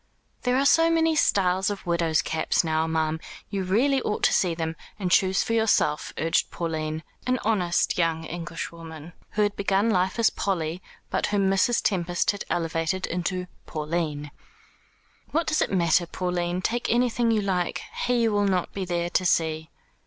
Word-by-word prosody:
"There 250 Hz, +1 st, +1 dB
are 275 Hz, -, +2 dB
so 330 Hz, +3 st, +5 dB
many 325 Hz, -1 st, +2 dB
styles 190 Hz, -8 st, +2 dB
of 205 Hz, -1 st, -5 dB
widows' 170 Hz, -2 st, +1 dB
caps 160 Hz, -, 0 dB
now, 160 Hz, 0 st, 0 dB
ma'am. 160 Hz, 0 st, 0 dB, 0.3 s
You 195 Hz, -2 st, -1 dB
really 255 Hz, +9 st, +2 dB
ought 210 Hz, -, -2 dB
to -, -, +4 dB
see 175 Hz, -3 st, +2 dB
them, 160 Hz, -1 st, -3 dB, 0.2 s
and 185 Hz, -3 st, -2 dB
choose 190 Hz, +1 st, +3 dB
for 230 Hz, -, -2 dB
yourself," 220 Hz, -9 st, +2 dB
urged 165 Hz, +1 st, +1 dB
Pauline, 160 Hz, -1 st, -3 dB, 0.2 s
an 255 Hz, 0 st, +2 dB
honest 180 Hz, -6 st, +1 dB
young 165 Hz, -1 st, +1 dB
Englishwoman, 165 Hz, -1 st, -7 dB, 0.2 s
who 210 Hz, -, +2 dB
had 205 Hz, 0 st, 0 dB
begun 200 Hz, +3 st, +1 dB
life 185 Hz, 0 st, +1 dB
as 230 Hz, -2 st, +4 dB
Polly, 175 Hz, -3 st, -2 dB, 0.3 s
but -, -, 0 dB
whom 195 Hz, -2 st, +1 dB
Mrs. 215 Hz, +5 st, +2 dB
Tempest 175 Hz, -5 st, +1 dB
had 200 Hz, -, -7 dB
elevated 165 Hz, +2 st, -1 dB
into 180 Hz, +1 st, -2 dB, 0.2 s
Pauline. 150 Hz, -2 st, -3 dB, 1.0 s
"What 330 Hz, +2 st, 0 dB
does 310 Hz, -, +1 dB
it -, -, 0 dB
matter, 175 Hz, -2 st, +2 dB
Pauline? 180 Hz, 0 st, -2 dB
Take 240 Hz, +4 st, -1 dB
anything 240 Hz, 0 st, +2 dB
you 220 Hz, -2 st, +2 dB
like. 180 Hz, -3 st, -1 dB, 0.2 s
He 240 Hz, -2 st, +3 dB
will 205 Hz, -2 st, +1 dB
not 185 Hz, -3 st, 0 dB
be 195 Hz, -1 st, -3 dB
there 175 Hz, -1 st, -2 dB
to 185 Hz, -, +2 dB
see." 160 Hz, -2 st, +1 dB
180 Hz, 165 wpm, -25 LUFS, 165-210 Hz, 1.0 s, so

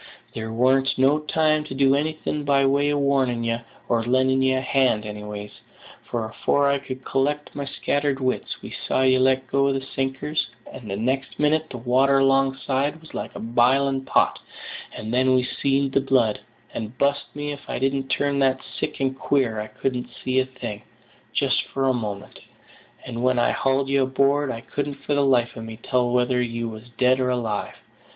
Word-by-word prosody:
There 110 Hz, 0 st, -5 dB
warn't 130 Hz, +3 st, +2 dB
no 135 Hz, +3 st, +4 dB
time 155 Hz, 0 st, +1 dB
to 135 Hz, -, -7 dB
do 135 Hz, 0 st, +4 dB
anything 150 Hz, +1 st, -1 dB
by 140 Hz, -1 st, +3 dB
way 140 Hz, +2 st, +2 dB
of 145 Hz, -, +1 dB
warning 135 Hz, -4 st, +1 dB
ye, 115 Hz, 0 st, 0 dB, 0.3 s
or 115 Hz, -1 st, +2 dB
lending 130 Hz, +2 st, +2 dB
ye 130 Hz, 0 st, +3 dB
a 130 Hz, -, +1 dB
hand 130 Hz, -5 st, +1 dB
anyways; 105 Hz, -1 st, -7 dB, 0.6 s
for, 115 Hz, -2 st, -2 dB
afore 140 Hz, +5 st, +1 dB
I 140 Hz, -, +1 dB
could 130 Hz, -1 st, -8 dB
collect 145 Hz, +2 st, -1 dB
my 140 Hz, -1 st, -3 dB
scattered 145 Hz, 0 st, -1 dB
wits, 130 Hz, -1 st, -2 dB
we -, -, -8 dB
saw 130 Hz, -, -1 dB
ye 130 Hz, 0 st, +4 dB
let 130 Hz, 0 st, +3 dB
go 140 Hz, +2 st, +2 dB
the 135 Hz, -, 0 dB, 0.2 s
sinker, 135 Hz, +3 st, -2 dB, 0.4 s
and 115 Hz, -, -9 dB, 0.2 s
next 130 Hz, +1 st, -1 dB
minute 155 Hz, +1 st, +1 dB
the 125 Hz, -, -6 dB
water 130 Hz, +3 st, +3 dB
alongside 135 Hz, +2 st, +1 dB
was 160 Hz, -, -16 dB
like -, -, -5 dB
a -, -, -6 dB
biling 130 Hz, +4 st, +2 dB
pot; -, -, +2 dB, 0.5 s
and 110 Hz, +2 st, -6 dB
then 130 Hz, +1 st, +3 dB
we 125 Hz, -, +3 dB
seed 135 Hz, +1 st, 0 dB
the 135 Hz, -, +2 dB
blood, 130 Hz, -5 st, +2 dB, 0.3 s
and 110 Hz, +2 st, -6 dB
bust 140 Hz, 0 st, +1 dB
me 145 Hz, 0 st, -3 dB
if 145 Hz, -, -9 dB
I -, -, -2 dB
didn't 135 Hz, 0 st, 0 dB
turn 140 Hz, 0 st, 0 dB
that 130 Hz, -1 st, +3 dB, 0.2 s
sick 150 Hz, -, -3 dB
and 135 Hz, -1 st, 0 dB
queer 130 Hz, -5 st, 0 dB
I 105 Hz, -, -4 dB
couldn't 125 Hz, +3 st, -3 dB, 0.2 s
see 130 Hz, 0 st, +2 dB
a 130 Hz, -, 0 dB
thing, 120 Hz, -5 st, -7 dB, 0.5 s
just -, -, +1 dB
for 135 Hz, 0 st, -1 dB
a 130 Hz, -, +3 dB
moment; 105 Hz, -5 st, -5 dB, 0.7 s
and 120 Hz, -1 st, -5 dB
when 130 Hz, 0 st, +2 dB
I 120 Hz, -, +3 dB
hauled 135 Hz, 0 st, +1 dB
ye 140 Hz, 0 st, +2 dB
aboard, 140 Hz, +2 st, +2 dB
I 115 Hz, -2 st, -4 dB
couldn't 145 Hz, +3 st, -4 dB
for 145 Hz, -, -3 dB
the 145 Hz, -, +3 dB
life 125 Hz, -3 st, +2 dB
of 115 Hz, -, -7 dB
me 110 Hz, 0 st, -8 dB
tell 125 Hz, +1 st, 0 dB
whether 125 Hz, 0 st, +2 dB
you 115 Hz, -1 st, -2 dB
was 110 Hz, +2 st, -10 dB
dead 130 Hz, 0 st, +4 dB
or 130 Hz, -1 st, +1 dB
alive. 115 Hz, -4 st, -2 dB
130 Hz, 190 wpm, -24 LUFS, 125-140 Hz, 0.7 s, no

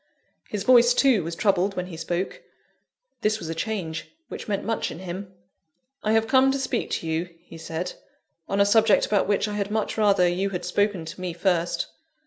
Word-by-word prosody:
His 205 Hz, -2 st, -3 dB
voice, 240 Hz, 0 st, +6 dB
too, 250 Hz, -10 st, +4 dB
was 165 Hz, +1 st, -4 dB
troubled 195 Hz, 0 st, +1 dB
when 180 Hz, -, -2 dB
he 180 Hz, -2 st, -8 dB
spoke. 175 Hz, +3 st, -3 dB, 0.8 s
This 215 Hz, 0 st, +2 dB
was 165 Hz, -7 st, -7 dB
a -, -, -1 dB
change, 165 Hz, -3 st, -4 dB, 0.2 s
which -, -, -7 dB
meant 200 Hz, -2 st, -2 dB
much 225 Hz, +1 st, -1 dB
in -, -, -7 dB
him. 185 Hz, +2 st, -6 dB, 0.7 s
"I 215 Hz, -, +2 dB
have 225 Hz, 0 st, +3 dB
come 265 Hz, +3 st, +5 dB
to 275 Hz, -, 0 dB
speak 260 Hz, -3 st, -2 dB
to 165 Hz, -, -3 dB
you," 160 Hz, +2 st, -1 dB
he 165 Hz, -2 st, -12 dB
said, 165 Hz, +2 st, -4 dB, 0.6 s
"on 200 Hz, -, 0 dB
a 200 Hz, -, +6 dB
subject 215 Hz, +1 st, +4 dB
about 205 Hz, -3 st, +1 dB
which 205 Hz, +1 st, +1 dB
I 210 Hz, -, -4 dB
had 205 Hz, -1 st, -2 dB
much 215 Hz, +1 st, -1 dB
rather 200 Hz, -4 st, +4 dB
you 185 Hz, +3 st, 0 dB
had 180 Hz, -3 st, -4 dB
spoken 195 Hz, -1 st, 0 dB
to 180 Hz, +3 st, -8 dB
me 180 Hz, -2 st, -3 dB
first." 175 Hz, -1 st, 0 dB
195 Hz, 200 wpm, -25 LUFS, 175-215 Hz, 0.8 s, voice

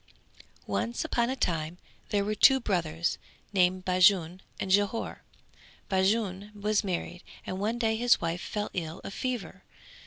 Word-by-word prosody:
Once 105 Hz, +4 st, -2 dB
upon 235 Hz, 0 st, +1 dB
a 260 Hz, -, -1 dB
time 165 Hz, -7 st, -1 dB, 0.3 s
there 200 Hz, -1 st, +1 dB
were 215 Hz, -, 0 dB
two 265 Hz, +5 st, +6 dB
brothers 170 Hz, -7 st, -1 dB, 0.3 s
named 185 Hz, -1 st, +2 dB
Bajun 185 Hz, -1 st, +4 dB, 0.2 s
and 190 Hz, -, -2 dB
Jhore. 205 Hz, +3 st, +1 dB, 0.7 s
Bajun 195 Hz, +1 st, +1 dB
was 210 Hz, 0 st, +1 dB
married 180 Hz, -2 st, -3 dB, 0.2 s
and 185 Hz, -, -4 dB
one 220 Hz, +4 st, -1 dB
day 225 Hz, -2 st, +1 dB
his 240 Hz, +1 st, +4 dB
wife 170 Hz, +1 st, -2 dB
fell 210 Hz, 0 st, -3 dB
ill 165 Hz, -1 st, -4 dB
of -, -, -7 dB
fever. 235 Hz, -6 st, -4 dB
190 Hz, 145 wpm, -29 LUFS, 175-215 Hz, 0.7 s, two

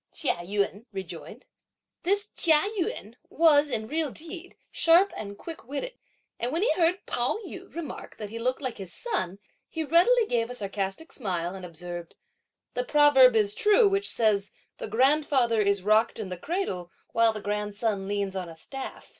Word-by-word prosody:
Chia 290 Hz, -, 0 dB
Yün 200 Hz, +4 st, -2 dB
rejoined. 190 Hz, -3 st, -8 dB, 0.6 s
This 405 Hz, +4 st, 0 dB
Chia 315 Hz, -3 st, +5 dB, 0.2 s
Yün 225 Hz, -, -3 dB, 0.2 s
was, 300 Hz, -2 st, +4 dB
in 220 Hz, -4 st, -2 dB
real 310 Hz, +2 st, -1 dB
deed, 335 Hz, +5 st, -9 dB
sharp 345 Hz, +4 st, +4 dB
and 200 Hz, -1 st, -6 dB
quick 330 Hz, +6 st, -8 dB
witted; 290 Hz, -, -4 dB, 0.5 s
and 240 Hz, +2 st, -2 dB
when 330 Hz, +6 st, 0 dB
he 475 Hz, -, +3 dB
heard 355 Hz, +2 st, +1 dB
Pao 245 Hz, +10 st, +1 dB
yü 375 Hz, +1 st, -9 dB
remark 335 Hz, -2 st, -7 dB
that 210 Hz, -2 st, -7 dB
he 230 Hz, -, -5 dB
looked 255 Hz, +4 st, -1 dB
like 255 Hz, -5 st, -3 dB
his 190 Hz, -3 st, -7 dB
son, 195 Hz, -, -3 dB, 0.3 s
he 320 Hz, -, -3 dB
readily 440 Hz, +10 st, +4 dB
gave 235 Hz, -, 0 dB
a 250 Hz, -, -5 dB
sarcastic 200 Hz, -, -4 dB
smile 180 Hz, -7 st, -2 dB
and 190 Hz, -1 st, -8 dB
observed, 175 Hz, 0 st, -8 dB, 0.6 s
"The 250 Hz, -, -1 dB
proverb 270 Hz, -3 st, +6 dB
is 210 Hz, -2 st, +3 dB
true 420 Hz, -, +5 dB
which 395 Hz, 0 st, 0 dB
says, 205 Hz, -3 st, +1 dB, 0.3 s
'the -, -, -4 dB
grandfather 255 Hz, -1 st, +3 dB
is 200 Hz, -2 st, +1 dB
rocked 215 Hz, +2 st, +3 dB
in 210 Hz, -4 st, -5 dB
the 180 Hz, -, -4 dB
cradle 185 Hz, -, -3 dB, 0.2 s
while 230 Hz, 0 st, +4 dB
the 215 Hz, -, -6 dB
grandson 205 Hz, 0 st, -2 dB
leans 200 Hz, -1 st, -2 dB
on 185 Hz, -2 st, -4 dB
a 165 Hz, -, -10 dB
staff.' 270 Hz, +10 st, -8 dB
235 Hz, 170 wpm, -27 LUFS, 200-320 Hz, 0.6 s, proverb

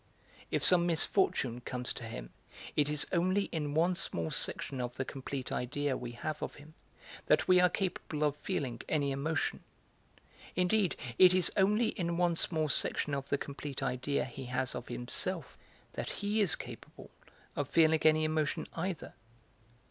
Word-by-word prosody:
If -, -, 0 dB
some 175 Hz, -1 st, +6 dB
misfortune 155 Hz, -, +1 dB
comes 125 Hz, 0 st, -3 dB
to -, -, -8 dB
him, 60 Hz, -, -7 dB, 0.4 s
it 150 Hz, -1 st, +2 dB
is 150 Hz, -1 st, +2 dB
only 185 Hz, +3 st, +2 dB
in 150 Hz, -3 st, -2 dB
one 170 Hz, +3 st, +3 dB
small 85 Hz, -, -1 dB
section 130 Hz, -2 st, -1 dB
of 125 Hz, 0 st, -4 dB
the 130 Hz, -, -1 dB
complete 135 Hz, 0 st, -5 dB
idea 140 Hz, +2 st, -1 dB
we 120 Hz, -1 st, -6 dB
have 155 Hz, +6 st, -4 dB
of -, -, -4 dB
him 150 Hz, +2 st, -14 dB, 0.5 s
that -, -, +4 dB
we 185 Hz, -1 st, +6 dB
are 180 Hz, 0 st, +6 dB
capable 175 Hz, -6 st, -2 dB
of 145 Hz, -1 st, +2 dB
feeling 130 Hz, -5 st, -3 dB
any 145 Hz, -3 st, +1 dB
emotion; 155 Hz, +4 st, -1 dB, 0.9 s
indeed 185 Hz, +1 st, +2 dB, 0.2 s
it 185 Hz, -1 st, +8 dB
is 185 Hz, -2 st, +5 dB
only 210 Hz, +4 st, +3 dB
in 170 Hz, -3 st, -2 dB
one 175 Hz, -1 st, +2 dB
small 160 Hz, -2 st, 0 dB
section 145 Hz, 0 st, 0 dB
of 140 Hz, -1 st, -3 dB
the 140 Hz, -, +2 dB
complete 140 Hz, -1 st, -6 dB
idea 135 Hz, +2 st, 0 dB
he 135 Hz, +1 st, -8 dB
has 125 Hz, +1 st, -1 dB
of -, -, -6 dB
himself 150 Hz, +5 st, -3 dB, 0.4 s
that -, -, -4 dB
he 210 Hz, +2 st, -1 dB
is 195 Hz, -, +3 dB
capable -, -, -10 dB, 0.4 s
of -, -, -2 dB
feeling 160 Hz, -1 st, +4 dB
any 155 Hz, 0 st, +5 dB
emotion 155 Hz, -1 st, 0 dB
either. 175 Hz, -1 st, -4 dB
150 Hz, 165 wpm, -32 LUFS, 135-175 Hz, 0.9 s, it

